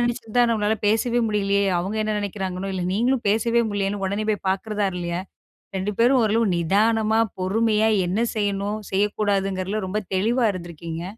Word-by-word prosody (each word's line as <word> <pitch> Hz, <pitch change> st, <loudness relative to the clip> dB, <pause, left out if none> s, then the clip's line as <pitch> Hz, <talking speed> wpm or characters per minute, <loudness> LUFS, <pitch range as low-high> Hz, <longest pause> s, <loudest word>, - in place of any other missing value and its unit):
நெனச்சிருந்தா 240 Hz, -1 st, 0 dB
நம்மளால 215 Hz, -1 st, +1 dB
பேசவே 235 Hz, +3 st, +2 dB
முடியலியே 200 Hz, -1 st, +1 dB
அவங்க 190 Hz, +4 st, -3 dB
என்ன 215 Hz, 0 st, -1 dB
நினைக்கிறாங்கனோ, 195 Hz, -1 st, -4 dB
இல்ல 185 Hz, -, -2 dB
நீங்களும் 245 Hz, +4 st, +1 dB
பேசவே 230 Hz, +3 st, +2 dB
முடியலியேன்னு 200 Hz, 0 st, -2 dB
உடனே 200 Hz, +3 st, -2 dB
போய் 205 Hz, -2 st, -2 dB
பாக்கிறதா 205 Hz, +2 st, -1 dB
இல்லையா? 175 Hz, 0 st, -3 dB, 0.6 s
2 190 Hz, +2 st, -2 dB
பேரு 240 Hz, +3 st, +5 dB
ஓரளவு 225 Hz, +1 st, +2 dB
நிதானமா, 215 Hz, +5 st, +2 dB, 0.2 s
பொறுமையா 215 Hz, +3 st, +2 dB, 0.2 s
என்ன 185 Hz, +5 st, -1 dB, 0.2 s
செய்யணும் 205 Hz, 0 st, -1 dB
செய்யக்கூடாதுங்கிறதுல 200 Hz, 0 st, 0 dB
ரொம்ப 205 Hz, +3 st, -1 dB
தெளிவா 230 Hz, +6 st, +2 dB
இருந்துருக்கீங்க. 170 Hz, -1 st, -7 dB
205 Hz, 140 wpm, -23 LUFS, 190-220 Hz, 0.6 s, பேரு